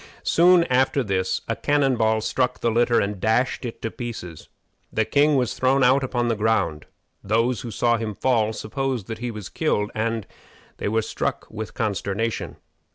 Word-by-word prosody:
Soon 175 +1 +5
after 130 -1 +2
this 95 -3 -1
a - - -1
cannon 145 -3 +2
ball 110 -1 +2
struck 125 +3 0
the 115 - +1
litter 120 +1 +3
and 100 -1 -2
dashed 120 +6 +1
it 115 - -7
to 115 - -2
pieces. 110 - -7 0.4
The 110 - +1
king 145 +6 +3
was 125 -3 +1
thrown 130 +1 +2
out 130 +2 +4
upon 120 -2 -1
the 115 - +1
ground. 105 -8 0 0.4
Those 115 +2 +1
who 120 - -6
saw 120 +1 +1
him 110 -2 -4
fall 115 -3 +1
supposed 125 +1 -3
that 110 0 -6
he 120 +1 -3
was 105 -5 -7
killed, 105 -10 -1
and 115 -1 -2 0.5
they - - -3
were 110 +1 +1
struck - - -3
with 110 0 -6
consternation. 110 +1 -2
115 Hz, 175 wpm, -23 LUFS, 110-130 Hz, 0.5 s, Soon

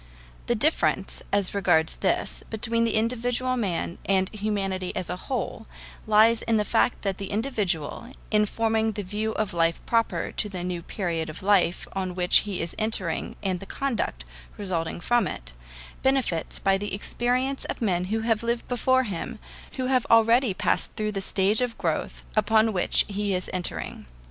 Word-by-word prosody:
The - - +2
difference, - - 0
as 200 -2 +1
regards 175 -5 +2
this, - - -1
between 230 +1 +1
the 230 - 0
individual 245 +3 0
man 185 -7 -2
and 190 -1 +1
humanity 195 -3 -2
as 180 - -3
a - - -2
whole, 225 +2 -4 0.4
lies 220 +1 +5
in 225 -1 +1
the 210 - +1
fact 230 +2 +1
that 195 -2 -2
the 195 - -5
individual, 210 - -2 0.2
in 210 -1 +3
forming 220 0 +1
the 205 0 -4
view 210 +3 -2
of 210 -3 -2
life 165 -1 +2
proper 230 -1 0
to 210 - -1
the 185 -3 -5
new 180 -1 -3
period 165 -3 -2
of 155 - -9
life 190 -3 +3
on 185 -2 -3
which 180 -1 +6
he 185 -4 -2
is 165 - -4
entering 215 -6 0
and 185 -2 0
the 195 - -10
conduct 225 - -2 0.3
resulting 175 -4 -2
from 240 -2 +2
it, - - -6 0.5
benefits 265 -11 +1
by 195 0 +2
the 205 0 -3
experience 250 +6 -1
of - - -4
men 180 -6 +1
who 220 +4 -1
have 225 -1 +1
lived 235 0 -2
before 260 +1 +2
him, 225 +2 -5 0.4
who 255 - -2
have 255 -2 +1
already 230 +1 +5
passed - - 0
through 215 0 -1
the 195 -2 -3
stage 195 +3 +2
of 245 -2 -1
growth - - -2
upon 220 +1 +3
which 180 - +4
he 205 -1 -1
is 180 - -3
entering. 180 -1 -3
210 Hz, 175 wpm, -26 LUFS, 185-230 Hz, 0.5 s, which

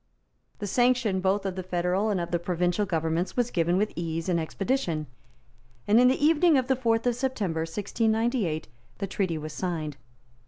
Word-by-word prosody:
The 205 - -5
sanction 240 -2 +2
both 195 +2 +1
of 190 -2 -2
the 185 - -3
federal 180 +3 0
and 200 -3 0
of 170 0 -4
the 175 - +1
provincial 180 +3 0
governments 165 +2 -1
was 245 -1 +1
given 170 +1 +1
with 210 +2 0
ease 165 0 -3
and 170 -2 +2
expedition; 170 - -1 0.8
and 215 +3 +5
in 250 - +6
the 265 +3 +2
evening 320 0 +5
of 260 - +1
the 265 +1 +2
fourth 230 -2 +1
of 245 - +3
September 225 -10 -2
1698, 210 +1 0 0.3
the 200 - -2
treaty 185 -3 -1
was 155 0 -6
signed. 155 -6 -3
190 Hz, 180 wpm, -27 LUFS, 170-235 Hz, 0.8 s, in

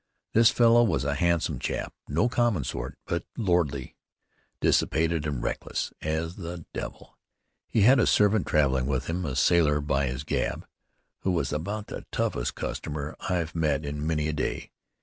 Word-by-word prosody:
This 115 +1 +6
fellow 120 -1 +5
was 85 - +1
a 70 - +1
handsome 85 +2 +1
chap, - - -3
no 85 +11 +2
common 120 - +1
sort, 60 - -5
but - - -2
lordly, 85 - 0 0.6
dissipated 80 -1 +2
and 70 -5 -3
reckless - - -3
as 80 +2 -2
the 85 -3 -6
devil. - - -7 0.5
He 110 - +1
had 130 +6 +6
a 115 - +3
servant 105 0 +3
traveling 65 -5 +2
with 65 -1 -1
him, 85 +3 -2
a 65 -4 -3
sailor, 75 +1 +4
by 70 -1 0
his 65 +3 -4
gab, - - -2 0.5
who - - -2
was 85 -6 0
about 100 +8 -3
the - - -8
toughest - - -1
customer 75 0 -4
I've 85 -3 -1
met 75 -3 0
in 75 +1 -3
many 75 -2 0
a 75 - -1
day. 75 - -3
80 Hz, 165 wpm, -27 LUFS, 70-90 Hz, 0.6 s, This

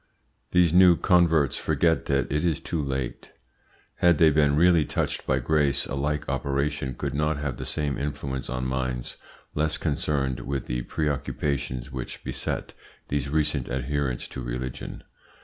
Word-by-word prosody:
These 90 -3 +4
new 90 -2 +7
converts 80 -6 +3
forget 80 -1 +1
that 70 -1 +1
it 75 +1 +1
is 85 -4 +1
too 85 - -2
late. 65 -3 -4 0.6
Had 85 -2 +4
they 80 0 +6
been 75 -1 +3
really 85 0 +5
touched - - -2
by 65 - +3
grace, 70 +1 +1
a - - -6
like 75 +2 -1
operation 70 0 -1
could - - -3
not 75 +1 +1
have 70 -3 -3
the - - -6
same 75 -2 -1
influence 70 -2 -4
on 65 0 -2
minds 65 -1 -2 0.4
less 80 +1 +1
concerned 70 -4 -1
with 70 +1 -3
the - - -2
preoccupations 70 -3 -2
which 65 -1 -6
beset - - -4 0.4
these 70 0 -1
recent 75 -3 0
adherents 65 0 -2
to 65 - -6
religion. 60 +1 -5
70 Hz, 150 wpm, -26 LUFS, 65-75 Hz, 0.6 s, new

